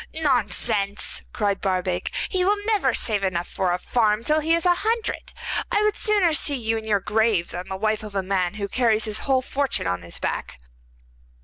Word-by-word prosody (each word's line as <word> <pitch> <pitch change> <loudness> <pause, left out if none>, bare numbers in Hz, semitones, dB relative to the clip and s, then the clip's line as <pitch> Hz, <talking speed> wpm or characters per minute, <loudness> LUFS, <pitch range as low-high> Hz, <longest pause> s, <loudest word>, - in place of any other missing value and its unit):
'Nonsense,' 235 -8 +1
cried 200 -2 -1
Barbaik, 185 -2 -1 0.2
'he 370 -2 0
will 405 +3 +3
never 410 - +2
save 215 -3 0
enough 175 -2 -1
for 185 -2 -1
a 175 - +1
farm 215 +2 +1
till 305 +5 +2
he 320 +2 +2
is 335 - -1
a 355 - +6
hundred. 450 +1 -2 0.4
I 415 - +2
would 425 0 +2
sooner 405 -6 +2
see 290 -1 +2
you 225 -3 -1
in 220 -1 -4
your 210 -2 +2
grave 210 -3 +1
than 180 +1 -6
the 190 - -3
wife 215 +1 0
of 210 -2 -9
a 195 - 0
man 185 0 -1
who 200 -2 -3
carries 225 -1 +1
his 215 -1 -2
whole 260 -1 +3
fortune 275 +1 -1
on 90 0 -1
his 85 0 -8
back. - - -4
220 Hz, 200 wpm, -23 LUFS, 195-295 Hz, 0.4 s, a